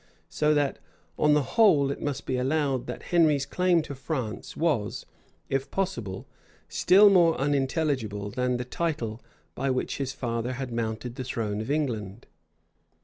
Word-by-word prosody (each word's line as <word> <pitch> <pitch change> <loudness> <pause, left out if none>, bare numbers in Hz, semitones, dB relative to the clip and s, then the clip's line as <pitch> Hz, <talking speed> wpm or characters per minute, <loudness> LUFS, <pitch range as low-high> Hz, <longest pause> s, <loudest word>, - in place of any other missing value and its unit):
So 150 0 +2
that, 145 -2 0 0.4
on 150 0 +4
the 150 - +3
whole, 150 - +4
it - - -6
must 145 -2 -3
be 130 - -1
allowed 135 0 0
that 125 - -6
Henry's 155 -5 +4
claim 175 +2 +2
to 145 - -7
France 130 -5 -5
was, 145 -11 0 0.4
if 135 +4 -2
possible, 120 - -3 0.4
still 200 +2 +6
more 170 -4 +5
unintelligible 135 - -1
than 125 +1 0
the 125 - -4
title 125 -6 -3 0.3
by 135 +2 -2
which 130 -1 -1
his 135 -2 -2
father 120 -1 -3
had 130 -1 -5
mounted 115 +1 -3
the 130 - -3
throne 110 -4 -3
of 110 - -6
England. 115 -9 -2
135 Hz, 150 wpm, -27 LUFS, 120-150 Hz, 0.4 s, still